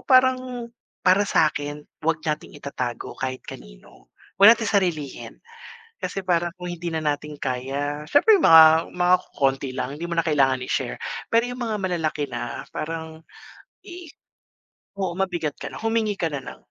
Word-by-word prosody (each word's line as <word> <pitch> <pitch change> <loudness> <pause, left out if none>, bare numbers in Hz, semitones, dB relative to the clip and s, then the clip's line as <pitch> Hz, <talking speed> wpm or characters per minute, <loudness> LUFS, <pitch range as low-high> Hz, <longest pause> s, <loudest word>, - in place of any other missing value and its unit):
parang 255 -2 +2 0.3
para 195 +2 +4
sakin, 145 -1 0 0.2
wag 160 -1 -1
nating 150 -1 -3
itatago 130 -4 -5
kahit 130 -1 -4
kanino. - - -13 0.3
'Wag 220 +4 +9
natin 225 - -4
sarilihin, 170 -8 -1 0.6
kasi 195 - -4
parang 175 -2 0
kung 180 -1 -7
hindi 175 -1 -5
na 160 - -1
natin 150 -1 -3
kaya 140 +3 -3
siyempre 340 - +5
yung - - +1
mga 160 0 +7
mga 180 0 +4
kokonti 135 -6 -1
lang, 140 +3 -4
hindi 170 - -5
mo 170 - -4
na 165 - +2
kailangan 135 -5 +2
i-share - - -3 0.3
pero 235 +2 +3
yung 245 - -6
mga 220 -2 -2
malalaki 160 -6 -2
na 120 -1 -5
parang, 160 0 -6 0.6
i 350 -3 -10 0.9
Oo 190 -3 -2
mabigat 175 -6 -1
ka - - -5
na, - - -7
humingi 225 -2 0
ka 170 - -1
na 140 -3 -4
ng 125 - -10
165 Hz, 160 wpm, -24 LUFS, 145-195 Hz, 0.9 s, Wag